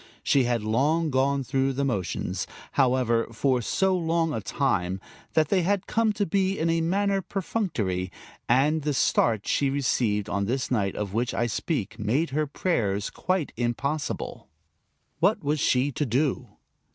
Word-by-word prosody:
She 135 -3 +3
had 120 -2 0
gone 140 +3 +1
through 135 +1 0
the 140 +2 -1
motions, 95 -6 -2 0.2
however, 125 -3 +2
for 125 +2 +1
so 190 - +1
long 165 -2 0
a - - -2
time 95 -9 0 0.3
that 155 -2 +3
they 190 - +3
had 200 +2 0
come 225 -1 +1
to 205 0 0
be 195 +2 +1
in 165 +1 +1
a 165 0 +1
manner 195 +3 +1
perfunctory, 120 - -2 0.4
and 145 +6 +3
the 150 -1 -1
start 110 -4 +2
she 140 - +2
received 120 -6 0
on 100 -1 -1
this 130 +6 -2
night 100 -6 0
of 100 -2 -4
which 120 +3 -1
I 120 - +1
speak 115 - -2
made 130 +9 0
her 150 +2 0
prayers 105 - -1
quite 185 -5 -1
impossible. 140 +5 -3 0.7
What - - +2
was 150 +1 0
she 130 +2 +2
to 145 +3 -1
do? 130 +1 0
135 Hz, 155 wpm, -26 LUFS, 115-160 Hz, 0.7 s, She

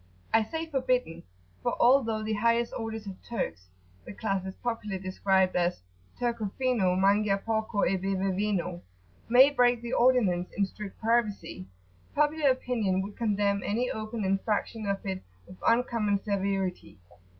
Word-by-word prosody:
I 225 0 +5
say 320 +9 -4
forbidden, 255 - -1 0.4
for - - -2
although 235 -4 +4
the 215 0 -1
highest 230 +2 +1
orders 225 -2 -5
of 195 -2 -8
Turks, 90 - -4 0.4
the - - -9
class 195 -3 -2
is 190 - -7
popularly 220 -5 -3
described 190 0 +1
as 175 - 0 0.3
"Turco 235 -4 -1
fino 235 -9 +2
Mangia 200 +1 +3
porco 220 0 -1
e 190 - +1
beve 190 0 -1
vino." 190 -3 -1 0.5
may 260 +4 +7
break 245 -3 +3
the 235 - -4
ordinance 215 -8 +3
in 200 - +3
strict 200 0 -9
privacy, 220 - -1 0.5
popular 300 0 +3
opinion 230 -7 0
would 200 +1 -8
condemn 205 -3 +1
any 240 +5 -1
open 215 -1 -4
infraction 205 +2 -1
of 195 0 -2
it 190 -1 -3 0.2
with 185 - -13
uncommon 230 -4 +2
severity. 195 - -2
210 Hz, 145 wpm, -28 LUFS, 195-235 Hz, 0.5 s, may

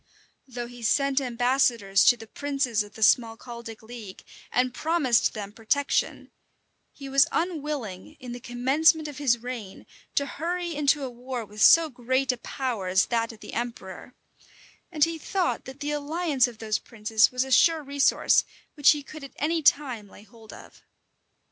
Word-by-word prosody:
Though 245 -2 -6
he 245 0 -12
sent 275 +4 +2
ambassadors 240 -5 +2
to 245 - +6
the 225 - -11
princes 270 -3 -1
of 210 0 -9
the 220 - -3
Smalcaldic 230 0 0
league, 220 -4 -10 0.3
and 250 0 +1
promised 295 -6 +1
them 205 -2 -6
protection, 235 +6 -1 0.6
he 275 - -10
was 275 +1 +4
unwilling, 300 - -4
in 250 -3 -8
the 245 - -6
commencement 270 +6 +2
of 290 -2 -8
his 255 -5 +2
reign, 230 -5 -8 0.3
to 280 - +2
hurry 345 +4 -3
into 290 -1 +1
a 265 - -3
war 245 -1 -6
with 210 +1 -9
so 330 -1 +7
great 260 +2 0
a 250 - -5
power 235 -5 -4
as 190 +2 +3
that 230 -1 -1
of 220 - -16
the - - -10
emperor; 235 -1 -6 0.8
and 305 -4 +1
he 330 0 0
thought 365 +2 -2
that 265 +3 -11
the 295 +1 -2
alliance 295 -2 0
of 240 -2 -10
those 215 -1 -2
princes 220 -1 +1
was 250 0 0
a 265 - -8
sure 320 +3 +4
resource, 280 0 +3 0.3
which 290 -1 +5
he 295 -1 -6
could 305 +1 -11
at 275 - -10
any 325 +2 -1
time 255 -8 +1
lay 205 - -15
hold 220 +1 -16
of. - - -14
255 Hz, 170 wpm, -26 LUFS, 230-290 Hz, 0.8 s, so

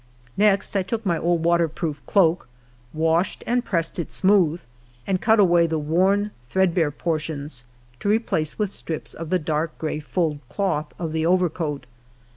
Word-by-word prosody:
Next 205 0 +2
I 195 - +3
took 220 +4 -4
my 170 -4 +1
old 170 -1 +1
water 170 -1 +3
proof 155 -2 -5
cloak, 170 -7 +3 0.4
washed 165 +4 0
and 245 +1 +1
pressed 170 -5 -2
it 170 - -4
smooth, 185 -4 +3 0.5
and 190 -2 0
cut 220 -1 +4
away 175 -3 +5
the 160 -1 -1
worn, 190 +7 +1 0.2
threadbare 180 -4 +2
portions, 150 -4 -4 0.3
to 205 - -1
replace 205 -8 0
with 210 -3 -1
strips 160 -5 -4
of 165 -1 -7
the 185 - +3
dark 155 -1 -2
gray 155 -1 -3
fulled 155 -1 -1
cloth 175 -7 -1
of 165 -3 -4
the 160 0 0
overcoat. 165 -6 0
170 Hz, 160 wpm, -23 LUFS, 155-190 Hz, 0.5 s, away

